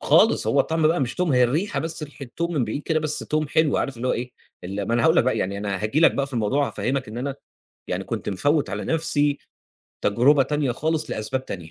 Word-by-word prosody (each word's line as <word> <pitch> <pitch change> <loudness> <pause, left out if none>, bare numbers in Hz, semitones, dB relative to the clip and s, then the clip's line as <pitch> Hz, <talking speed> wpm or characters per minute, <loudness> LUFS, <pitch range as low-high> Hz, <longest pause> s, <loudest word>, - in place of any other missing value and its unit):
خالص - - +4
هو - - +3
الطعم 160 -1 +1
بقى 165 -1 +1
مش 125 -3 -1
توم 180 -4 0
هي 125 -1 +5
الريحة 155 +12 0
بس 165 0 -3
ريحة 145 -2 -8
توم 170 0 -1
من 135 - +1
بعيد 115 +7 -4
كده 160 0 +1
بس 155 -1 +1
توم 155 -1 -1
حلو 155 -1 +2
عارف 135 - -2
اللي 125 +2 -2
هو - - +2
إيه 125 +1 -3 0.3
ال 100 +3 -4
ما 115 - +1
أنا 120 - +2
هاقول 160 +1 +4
لك - - +5
بقى 130 - +1
يعني 100 +2 -2
أنا 100 -1 -3
هاجي 110 +9 +1
لك 165 - +7
بقى 140 - 0
في 135 - -8
الموضوع 130 +5 +1
هافهّمك 125 +4 -2
إن 110 +3 -6
أنا 135 +1 -3 0.5
يعني - - -2
كنت - - -4
مفوّت 145 - +1
على - - -4
نفسْي 145 -3 +1 0.7
تجربة 135 +7 +4
تانية 145 -3 -1
خالص 155 +4 -1
لأسباب 130 +5 -3
تانية. 85 -9 -7
140 Hz, 240 wpm, -23 LUFS, 120-155 Hz, 0.7 s, لك